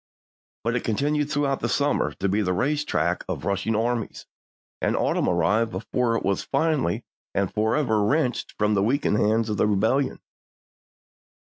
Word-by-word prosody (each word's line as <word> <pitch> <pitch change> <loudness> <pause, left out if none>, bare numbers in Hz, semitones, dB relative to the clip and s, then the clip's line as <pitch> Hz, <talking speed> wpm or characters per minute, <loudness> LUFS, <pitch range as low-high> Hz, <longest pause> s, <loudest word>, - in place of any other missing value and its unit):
But 115 +1 0
it 125 - -1
continued 145 +6 0
throughout 145 -2 0
the - - -2
summer 145 0 +1
to 100 - -1
be 100 +3 +1
the 90 -3 0
race 150 +8 0
track - - 0
of - - -4
rushing 100 +3 0
armies, 115 0 -2 0.6
and - - +1
autumn - - +1
arrived 105 +7 +2
before 115 +4 -1
it - - -4
was 100 -1 +1
finally 140 - 0 0.3
and 100 -2 0
forever 110 +1 +1
wrenched 130 +2 0
from 105 0 +2
the 100 - +2
weakened 115 0 +1
hands 110 +2 +2
of 105 -2 -2
the - - +3
Rebellion. 110 +7 +1
115 Hz, 160 wpm, -25 LUFS, 105-140 Hz, 0.6 s, the